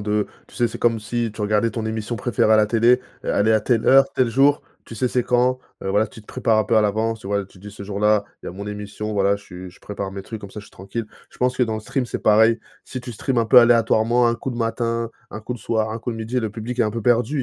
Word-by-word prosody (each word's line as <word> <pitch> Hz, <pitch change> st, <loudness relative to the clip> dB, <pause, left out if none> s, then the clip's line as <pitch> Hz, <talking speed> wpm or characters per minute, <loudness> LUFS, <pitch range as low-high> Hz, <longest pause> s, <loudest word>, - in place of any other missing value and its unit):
de 105 Hz, 0 st, 0 dB, 0.2 s
tu -, -, -20 dB
sais? 120 Hz, -1 st, +1 dB
C'est -, -, -8 dB
comme 115 Hz, -2 st, +1 dB
si 115 Hz, +1 st, -2 dB
tu 105 Hz, -, -10 dB
regardais 105 Hz, +2 st, +1 dB
ton 110 Hz, 0 st, -4 dB
émission 110 Hz, +1 st, -3 dB
préférée 110 Hz, 0 st, +1 dB
à 110 Hz, -, +7 dB
la 105 Hz, -1 st, +4 dB
télé 120 Hz, +3 st, +3 dB, 0.2 s
e -, -, -4 dB
elle 105 Hz, +2 st, +2 dB
est -, -, +5 dB
à 110 Hz, -, +3 dB
telle 115 Hz, 0 st, 0 dB
heure, 135 Hz, +1 st, +7 dB
tel 130 Hz, -2 st, +2 dB
jour, 140 Hz, +4 st, +3 dB, 0.2 s
tu 115 Hz, -, -10 dB
sais 125 Hz, +4 st, 0 dB
c'est 125 Hz, 0 st, 0 dB
quand, 125 Hz, +1 st, +1 dB, 0.2 s
heu, -, -, -3 dB
voilà 105 Hz, +3 st, +2 dB
tu 110 Hz, -, -13 dB
te 105 Hz, -, -22 dB
prépares 110 Hz, -1 st, +1 dB
un 110 Hz, -, +2 dB
peu 115 Hz, +2 st, +1 dB
à 110 Hz, -, +5 dB
l'avance, 110 Hz, +2 st, 0 dB
tu -, -, -10 dB
voilà, 100 Hz, -1 st, -1 dB
tu 95 Hz, -, -19 dB
dis: 105 Hz, +2 st, -10 dB
«Ce 100 Hz, 0 st, -10 dB
jour-là 105 Hz, +1 st, +1 dB, 0.2 s
il -, -, -9 dB
y -, -, -3 dB
a -, -, -7 dB
mon 100 Hz, +3 st, -7 dB
émission, 105 Hz, +1 st, -5 dB
voilà 100 Hz, 0 st, +2 dB
je 100 Hz, -, -16 dB
suis 90 Hz, 0 st, -10 dB
je 90 Hz, -, -21 dB
prépare 100 Hz, -1 st, -5 dB
mes 100 Hz, -, -6 dB
trucs 110 Hz, +1 st, -8 dB
comme 100 Hz, -, -9 dB
ça 105 Hz, -, -8 dB
je -, -, -14 dB
suis -, -, -19 dB
tranquille». 100 Hz, +4 st, -6 dB, 0.2 s
Je -, -, -20 dB
pense 125 Hz, 0 st, +1 dB
que 125 Hz, -, +2 dB
dans 110 Hz, -2 st, 0 dB
le 110 Hz, -, -4 dB
stream 135 Hz, +3 st, -2 dB
c'est -, -, -4 dB
pareil, 110 Hz, +2 st, +4 dB, 0.3 s
si 130 Hz, -, -6 dB
tu 120 Hz, 0 st, -8 dB
stream 125 Hz, +3 st, -1 dB
un 115 Hz, -, +1 dB
peu 125 Hz, -, +8 dB
aléatoirement 120 Hz, 0 st, +3 dB
un 120 Hz, -, +2 dB
coup 130 Hz, -, -5 dB
le 120 Hz, -, -6 dB
matin, 115 Hz, 0 st, -1 dB, 0.2 s
un 110 Hz, -, -7 dB
coup 110 Hz, -, -5 dB
le -, -, -9 dB
soir, 110 Hz, 0 st, -1 dB
un 115 Hz, -, -4 dB
coup 120 Hz, -, -4 dB
le 115 Hz, -, -5 dB
midi 115 Hz, +3 st, -2 dB
le 110 Hz, -, -2 dB
public 120 Hz, +3 st, -4 dB
est -, -, +6 dB
un 105 Hz, -, 0 dB
peu 115 Hz, -, -4 dB
perdu 125 Hz, +5 st, +1 dB
110 Hz, 310 wpm, -22 LUFS, 105-120 Hz, 0.3 s, peu